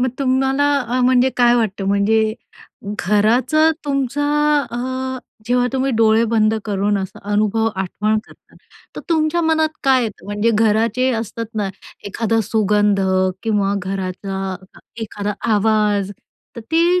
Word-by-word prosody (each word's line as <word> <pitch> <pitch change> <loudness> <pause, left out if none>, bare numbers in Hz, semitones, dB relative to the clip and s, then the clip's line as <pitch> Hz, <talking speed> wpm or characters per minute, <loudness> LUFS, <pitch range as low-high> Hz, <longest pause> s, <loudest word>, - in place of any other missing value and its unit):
मग 255 - +2
तुम्हाला 270 +1 +1
अ, 250 0 -2
म्हणजे 255 +1 +3
काय 240 -1 +4
वाटतं, 205 -4 -1
म्हणजे 215 +2 +2 0.6
घराचं 240 - +3
तुमचा 275 0 -1 0.5
अ, 240 - -4 0.7
जेव्हा 245 0 +2
तुम्ही 265 0 0
डोळे 225 0 +4
बंद 215 -1 +3
करून 205 0 0
असं 190 -1 -6
अनुभव 215 +2 +1
आठवण 210 +3 -1
करता, - - -21 0.4
तर - - -4
तुमच्या 315 +1 +1
मनात 315 -1 +2 0.2
काय 265 -2 +4
येतं? 215 -3 -7
म्हणजे 205 +3 0
घराचे 225 +4 +2
असतात 230 +1 -5
ना 205 -2 -1 0.4
एखादा 225 +2 0
सुगंध 210 -1 +1 0.4
किंवा 205 -3 0
घराचा 190 0 -4 0.5
एखादा 205 -1 -4 0.2
आवाज, 210 -2 +1 0.5
तर - - -5
ती 335 +9 +2
220 Hz, 125 wpm, -19 LUFS, 205-255 Hz, 0.7 s, काय